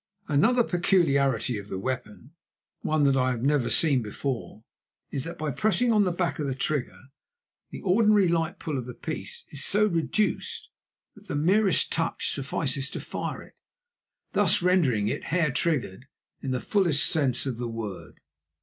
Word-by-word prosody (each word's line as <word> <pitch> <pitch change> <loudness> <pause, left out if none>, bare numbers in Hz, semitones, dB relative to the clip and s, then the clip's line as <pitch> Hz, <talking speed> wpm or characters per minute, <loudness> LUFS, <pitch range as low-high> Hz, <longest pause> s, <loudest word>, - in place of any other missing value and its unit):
Another 230 - +3
peculiarity 140 - +1
of 100 - -10
the 95 - -5
weapon, 125 +3 -5 0.5
one 155 -1 +1
that 140 -1 +4
I 130 -1 +2
have 120 -2 -2
never 140 -3 +2
seen 140 -6 +3
before, 115 +1 -5 0.5
is 135 -2 -2
that 165 - -6
by 155 -1 -2
pressing 220 - +2
on 210 -2 +4
the 180 - +1
back 175 -1 -2
of 145 - -1
the 135 - -2
trigger 135 -2 -2 0.7
the - - -8
ordinary 205 0 +4
light 170 0 0
pull 150 -5 -3
of 125 - -7
the 125 - -7
piece - - -5
is 145 0 -1
so 210 +2 +3
reduced 195 +2 -1 0.4
that - - -18
the - - -3
merest 190 +6 +3
touch 165 0 0
suffices 140 0 -2
to - - -6
fire - - -5
it, - - -20 0.7
thus - - +3
rendering 145 - +3
it - - -3
hair 160 -2 +1
triggered 130 - -1 0.3
in 135 - -4
the 130 -1 0
fullest 175 -8 +2
sense 135 -6 +1
of 130 -4 -3
the 120 - -2
word. 110 -5 -7
145 Hz, 170 wpm, -26 LUFS, 130-175 Hz, 0.7 s, that